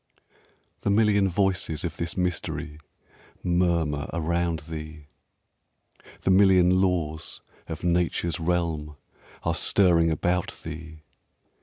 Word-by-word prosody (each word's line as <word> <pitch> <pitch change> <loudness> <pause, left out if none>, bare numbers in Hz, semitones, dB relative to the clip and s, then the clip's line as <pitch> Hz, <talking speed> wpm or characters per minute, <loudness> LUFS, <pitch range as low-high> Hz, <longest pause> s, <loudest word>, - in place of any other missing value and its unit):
The - - -2
million 100 -2 +3
voices 95 -4 0
of 85 - -3
this 85 +2 -4
mystery 85 -4 -2 0.6
Murmur 85 -4 +1
around 85 0 -1
thee, 75 -2 -8 1.1
The - - +1
million 95 -1 +5
laws 80 -5 -1 0.3
of 80 - -6
nature's 85 -1 0
realm 80 -3 -1 0.5
Are 85 - +1
stirring 85 -2 +3
about 90 +3 -1
thee. 80 -1 -8
85 Hz, 100 wpm, -26 LUFS, 80-90 Hz, 1.1 s, million